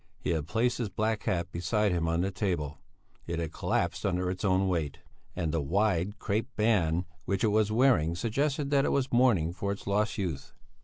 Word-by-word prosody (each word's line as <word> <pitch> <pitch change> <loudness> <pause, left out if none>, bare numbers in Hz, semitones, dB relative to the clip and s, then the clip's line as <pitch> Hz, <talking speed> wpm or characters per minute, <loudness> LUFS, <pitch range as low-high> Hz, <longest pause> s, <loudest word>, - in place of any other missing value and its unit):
He - - -2
had 80 -3 -1
placed 115 +7 +1
his 115 -4 -1
black 110 +1 -1
hat 85 -2 -1
beside 100 +4 +1
him 85 -2 0
on 85 +1 +1
the 95 +2 0
table; 85 -7 -2 0.5
it 85 0 -2
had 80 -2 -3
collapsed - - -1
under 90 -1 0
its 90 - -6
own 95 -1 +2
weight, 80 -6 -1 0.4
and 80 -3 -1
the 80 -1 0
wide 95 +4 +1
crape 110 +1 -1
band 90 -6 +2 0.2
which 100 +2 -1
it 110 - +4
was 105 0 +2
wearing 110 - +3
suggested 140 - -1
that 140 -1 +4
it - - +1
was 135 -2 0
mourning 110 -10 +3
for 100 +2 -2
its 100 - -6
lost 105 +3 0
youth. 85 -9 -4
95 Hz, 200 wpm, -29 LUFS, 85-110 Hz, 0.5 s, it